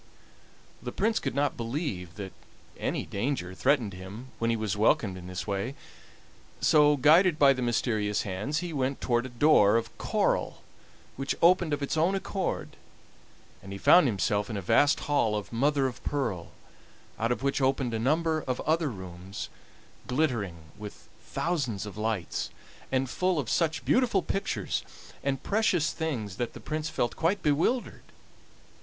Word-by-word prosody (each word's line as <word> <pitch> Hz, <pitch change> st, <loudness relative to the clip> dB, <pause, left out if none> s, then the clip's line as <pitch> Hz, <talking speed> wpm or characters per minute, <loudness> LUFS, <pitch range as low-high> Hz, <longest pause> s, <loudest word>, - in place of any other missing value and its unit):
The -, -, -5 dB
Prince 225 Hz, +1 st, +1 dB
could -, -, -3 dB
not 145 Hz, +1 st, +1 dB
believe 115 Hz, -, -4 dB
that 100 Hz, -3 st, -7 dB, 0.4 s
any -, -, -2 dB
danger 100 Hz, -4 st, -2 dB
threatened 125 Hz, -1 st, +1 dB
him 95 Hz, +8 st, -9 dB
when 115 Hz, -, +1 dB
he 115 Hz, -, +2 dB
was 110 Hz, -2 st, -2 dB
welcomed 105 Hz, -2 st, +2 dB
in 90 Hz, -1 st, -9 dB
this 90 Hz, 0 st, -5 dB
way, 100 Hz, +6 st, -2 dB, 0.8 s
so, 150 Hz, -1 st, +5 dB
guided 160 Hz, +5 st, +5 dB
by 140 Hz, -3 st, +6 dB
the 130 Hz, -, -4 dB
mysterious 110 Hz, -4 st, 0 dB
hands, 105 Hz, -, -2 dB
he 170 Hz, -, -5 dB
went 135 Hz, -1 st, -1 dB
toward 120 Hz, 0 st, 0 dB
a -, -, -10 dB
door 120 Hz, -5 st, +5 dB
of 115 Hz, 0 st, -4 dB
coral, -, -, 0 dB, 0.5 s
which 135 Hz, +1 st, -1 dB
opened 175 Hz, -1 st, +4 dB
of 145 Hz, -1 st, -1 dB
its 140 Hz, -, -1 dB
own 170 Hz, +5 st, +3 dB
accord, 195 Hz, 0 st, -3 dB, 0.8 s
and 100 Hz, -, -10 dB
he -, -, -5 dB
found 175 Hz, -, +6 dB
himself 105 Hz, -1 st, 0 dB
in 110 Hz, -, -3 dB
a -, -, -1 dB
vast 145 Hz, -, +4 dB
hall 130 Hz, -7 st, +1 dB
of 105 Hz, +2 st, -5 dB
mother 140 Hz, +3 st, +2 dB
of 130 Hz, 0 st, -4 dB
pearl, 110 Hz, -12 st, -2 dB, 0.7 s
out 115 Hz, +2 st, +1 dB
of 120 Hz, 0 st, -2 dB
which 140 Hz, 0 st, 0 dB
opened 130 Hz, -2 st, +1 dB
a 110 Hz, -, -1 dB
number 155 Hz, +5 st, +1 dB
of 130 Hz, -1 st, -1 dB
other 160 Hz, 0 st, +1 dB
rooms, 95 Hz, -2 st, -7 dB, 0.6 s
glittering 105 Hz, -, -1 dB
with 105 Hz, -1 st, -9 dB, 0.2 s
thousands 140 Hz, -, -2 dB
of 100 Hz, -3 st, -8 dB
lights, 110 Hz, -4 st, -2 dB, 0.4 s
and 135 Hz, 0 st, +1 dB
full 180 Hz, +6 st, 0 dB
of 140 Hz, -6 st, -2 dB
such 165 Hz, -1 st, 0 dB
beautiful 240 Hz, -7 st, +3 dB
pictures 195 Hz, 0 st, -2 dB, 0.4 s
and 135 Hz, -1 st, -1 dB
precious 195 Hz, -7 st, +2 dB
things 115 Hz, -, -3 dB
that 120 Hz, -, -3 dB
the -, -, -9 dB
Prince 155 Hz, 0 st, -3 dB
felt 120 Hz, -6 st, -1 dB
quite 175 Hz, +5 st, 0 dB
bewildered. 160 Hz, -, +1 dB
130 Hz, 160 wpm, -28 LUFS, 105-155 Hz, 0.8 s, by